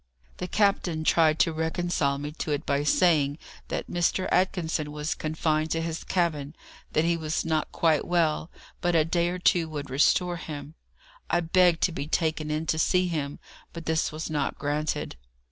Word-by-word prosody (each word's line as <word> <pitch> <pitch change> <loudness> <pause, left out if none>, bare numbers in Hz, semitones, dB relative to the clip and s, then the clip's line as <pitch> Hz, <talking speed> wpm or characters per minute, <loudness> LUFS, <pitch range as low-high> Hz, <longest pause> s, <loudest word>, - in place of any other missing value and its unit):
The 180 - -4
captain 180 -5 +1
tried 155 -1 +4
to 165 - +2
reconcile 160 -3 0
me 145 +1 -5
to - - -3
it 150 +1 -1
by 140 0 +1
saying 150 -3 +3 0.3
that - - -3
Mr. 175 +2 0
Atkinson 165 -5 0
was 150 +1 -2
confined 155 0 -1
to 165 - 0
his 165 -1 -4
cabin, 155 -5 -1 0.4
that 155 - +2
he 170 0 +2
was 160 0 -2
not 160 -2 0
quite 160 -3 +2
well, 165 -2 +1 0.3
but 175 -1 +1
a 155 -2 +4
day 170 +1 +1
or 180 - -3
two 175 -2 +2
would 145 -3 -6
restore 175 +6 +2
him. 150 -3 -7 0.6
I 175 - +3
begged 175 0 +3
to 185 - +3
be 150 -3 -4
taken 160 -1 0
in 155 +1 -1
to 160 0 0
see 180 +2 +2
him, 145 -4 -3 0.4
but 170 -1 -8
this 160 0 0
was 155 +1 -5
not 150 -2 -2
granted. 150 - -2
160 Hz, 180 wpm, -27 LUFS, 150-170 Hz, 0.6 s, tried